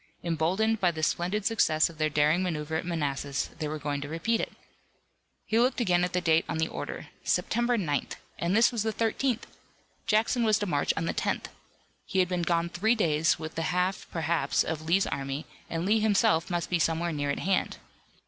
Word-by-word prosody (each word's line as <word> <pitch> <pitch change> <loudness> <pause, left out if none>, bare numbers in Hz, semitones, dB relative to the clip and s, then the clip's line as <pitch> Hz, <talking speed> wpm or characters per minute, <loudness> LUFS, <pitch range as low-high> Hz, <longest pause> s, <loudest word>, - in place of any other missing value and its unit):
Emboldened 180 +7 +1
by 180 - +4
the 160 -2 -4
splendid 185 +6 0
success 155 -9 +3
of 165 -2 -13
their 155 0 +2
daring 150 +4 +3
maneuver 160 -3 -2
at 165 - -2
Manassas 140 -4 -2
they 155 - -2
were 155 +1 -3
going 145 -1 -3
to 145 - -5
repeat 185 +9 0
it. - - -4 0.9
He 220 - +1
looked 250 +3 +2
again 180 -6 +2
at 180 - 0
the 180 - +2
date 165 -1 +3
on - - -1
the 160 0 +1
order. - - -6
September 240 +1 +1
9th! 150 -8 -1 0.3
And 170 +3 0
this 230 - +5
was 235 -3 -2
the 220 +1 0
13th! 230 +3 0 0.6
Jackson 225 +3 +2
was 215 -2 +4
to 210 - -2
march 145 -7 +1
on 165 - -1
the - - -1
10th. - - -2 0.5
He 190 - -4
had 180 -1 +3
been 180 -1 -1
gone 170 0 +1
three 210 +7 +1
days 160 -6 +2
with 155 0 -6
the 165 - -3
half, 180 +2 0
perhaps, 165 0 +1
of 160 -1 -3
Lee's 170 +5 +2
army, 140 +2 -3 0.2
and 165 +1 -2
Lee 215 +3 +3
himself 195 -6 +2
must 175 0 -2
be 175 - +2
somewhere 165 +1 +1
near 145 -2 -2
at 140 - 0
hand. 190 0 0
170 Hz, 205 wpm, -28 LUFS, 155-205 Hz, 0.9 s, this